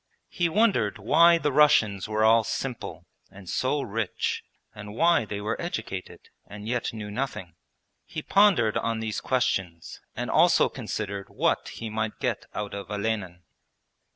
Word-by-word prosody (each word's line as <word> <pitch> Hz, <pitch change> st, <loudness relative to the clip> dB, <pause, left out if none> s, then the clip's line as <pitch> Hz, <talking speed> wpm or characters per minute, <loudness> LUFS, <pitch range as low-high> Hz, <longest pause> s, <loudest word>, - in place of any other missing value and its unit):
He 175 Hz, -2 st, 0 dB
wondered 190 Hz, -, +2 dB
why 165 Hz, +11 st, +5 dB
the 150 Hz, -3 st, 0 dB
Russians 115 Hz, -10 st, +4 dB
were 110 Hz, 0 st, +1 dB
all 115 Hz, +1 st, +5 dB
'simple' 115 Hz, +2 st, -5 dB, 0.2 s
and 95 Hz, -1 st, -14 dB
so 135 Hz, +8 st, 0 dB
rich, 110 Hz, -2 st, -2 dB, 0.3 s
and 105 Hz, 0 st, -9 dB
why 165 Hz, -5 st, +3 dB
they 105 Hz, -1 st, -5 dB
were 105 Hz, +2 st, -3 dB
educated, 110 Hz, -, -5 dB, 0.3 s
and 105 Hz, +1 st, -9 dB
yet 120 Hz, 0 st, -1 dB
knew 105 Hz, -2 st, -7 dB
nothing. 105 Hz, -7 st, -4 dB, 0.5 s
He 155 Hz, -, -6 dB
pondered 195 Hz, -, +4 dB
on 115 Hz, 0 st, -1 dB
these 110 Hz, -1 st, -3 dB
questions 95 Hz, -10 st, -2 dB
and -, -, -3 dB
also -, -, +5 dB
considered 100 Hz, -2 st, -5 dB
what -, -, 0 dB
he 115 Hz, -1 st, -6 dB
might 110 Hz, 0 st, -3 dB
get -, -, -2 dB
out 105 Hz, -1 st, -4 dB
of 100 Hz, -2 st, -6 dB
Olenin. 100 Hz, -4 st, -3 dB
110 Hz, 150 wpm, -26 LUFS, 100-135 Hz, 0.5 s, why